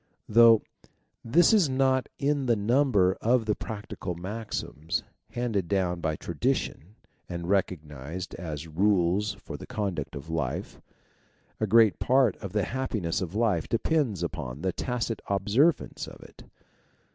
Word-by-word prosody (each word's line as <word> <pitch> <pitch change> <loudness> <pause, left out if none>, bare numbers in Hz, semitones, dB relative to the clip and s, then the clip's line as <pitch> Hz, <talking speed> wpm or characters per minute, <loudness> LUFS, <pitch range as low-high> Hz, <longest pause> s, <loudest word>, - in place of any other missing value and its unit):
Though 115 0 +7 0.6
this 165 - +4
is 195 -9 +4
not 130 0 +2
in 140 -1 0
the 120 - +4
number 105 -4 +3
of 120 0 +2
the 105 - +2
practical 105 -4 -6
maxims 85 -4 -4 0.3
handed 115 -7 -1
down 90 -3 0
by 80 -2 0
tradition 90 +5 -2 0.3
and 85 0 -5
recognized 85 -3 -2
as 80 -3 -6
rules 95 +3 +2
for 80 -6 -8
the - - -10
conduct 95 -9 -3
of 70 +2 -8
life, 80 -6 -3 0.8
a 110 - 0
great 110 -1 +5
part 130 -4 +3
of 100 -4 -7
the 105 0 +1
hap 130 +4 -3
piness 85 -7 -1
of 90 +1 -4
life 105 -8 +1
depends 115 - 0
upon 75 -5 -5
the 95 - 0
tacit 120 -3 -2
observance 110 - +1
of - - -11
it. - - -15
100 Hz, 140 wpm, -27 LUFS, 85-115 Hz, 0.8 s, Though